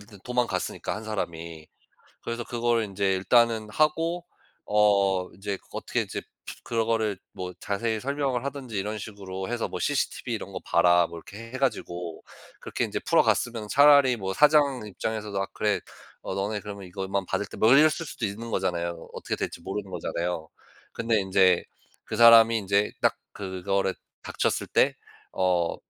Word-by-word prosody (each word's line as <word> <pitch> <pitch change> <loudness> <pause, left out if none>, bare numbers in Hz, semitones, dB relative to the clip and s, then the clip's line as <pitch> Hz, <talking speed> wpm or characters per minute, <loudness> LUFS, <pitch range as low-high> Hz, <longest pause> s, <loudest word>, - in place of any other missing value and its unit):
일단 100 -1 -15
도망갔으니까 125 -7 -1
1 110 - -6
사람이. 85 -7 -5 0.6
그래서 115 0 -4
그거를 120 -1 0
인제 100 -1 0
일단은 110 +3 +3
하고 165 +5 +1 0.4
어 100 -3 +3
인제 100 +2 -4
그 - - -30
어떻게 - - -2
이제 - - -5 0.4
그런 115 -1 0
거를 110 -4 0
뭐 90 0 -6
자세히 110 +2 -1
설명을 135 -2 -1
하든지 135 -6 -5
이런 105 +2 -2
식으로 95 -3 -6
해서 120 -1 -2
뭐 - - -5
"cctv 135 -3 -1
이런 105 -3 -5
거 - - -5
봐라." 85 0 +4
뭐 85 - -9
이렇게 110 +7 -10
해 - - -3
가지고 90 -11 -3 0.4
그렇게 - - -3
인제 - - -2
풀어갔으면 115 -3 +2
차라리 140 -2 +6
뭐 95 -2 -3
사장 145 -3 +4
입장에서도 105 -1 -3
"아 95 - 0
그래 105 -1 +1 0.4
어 - - -5
너네 105 +2 -1
그러면 100 -2 -8
이것만 95 +1 -3
받을테" 100 +2 -3
뭐 110 - +4
이랬을 150 +4 +7 0.2
수도 130 -6 -4
있는 110 +3 -5
거잖아요. 85 -3 -2
어떻게 - - -3
될지 - - -4
모르는 95 +3 -5
거잖아요. 85 -2 -3 0.4
근데 115 -1 +1
인제 95 -2 +4 0.4
그 - - -5
사람이 115 -1 +8
인제 100 0 +1
딱 - - +3 0.2
그거를 95 0 -2 0.3
닥쳤을 - - -1
때 - - +3 0.4
어 90 -2 +1
105 Hz, 350 characters per minute, -26 LUFS, 95-115 Hz, 0.6 s, 사람이